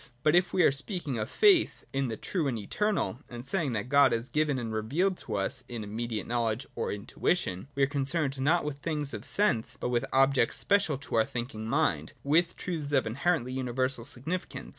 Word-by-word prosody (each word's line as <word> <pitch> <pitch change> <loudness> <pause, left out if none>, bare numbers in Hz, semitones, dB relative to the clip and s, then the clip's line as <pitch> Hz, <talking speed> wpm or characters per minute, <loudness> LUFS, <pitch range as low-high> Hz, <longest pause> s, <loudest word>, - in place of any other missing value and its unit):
But 155 +2 +4
if 175 0 +3
we 185 - +3
are - - +6
speaking 140 - -2
of 110 - -3
faith 405 -5 +4
in 135 -1 0
the 110 -2 -4
True 170 -7 -1
and 125 -4 -1
Eternal, 195 - -1
and 120 0 -8
saying 145 -3 0
that 105 +1 -2
God 140 0 +5
is 115 +2 -2
given 150 -2 +1
and 115 -3 -4
revealed 150 - +1
to 110 - -5
us 100 -1 -2
in 120 -3 -5
immediate 110 +1 -3
knowledge 115 +1 -1
or - - -2
intuition, 100 - -1
we 140 - +2
are - - +7
concerned 140 0 0
not 160 +4 +3
with 150 -2 -3
the - - -30
things 150 -3 -2
of - - -6
sense, 200 - +1
but - - -2
with 120 +1 +1
objects 135 -2 +3
special 200 -8 +2
to 125 -3 -10
our 110 - +4
thinking 120 -3 -5
mind, 150 +6 0
with 165 +5 +2
truths 155 -5 -4
of 135 - +3
inherently 130 +2 0
universal 130 -1 -1
significance. 160 +11 -5
135 Hz, 205 wpm, -29 LUFS, 120-160 Hz, -, are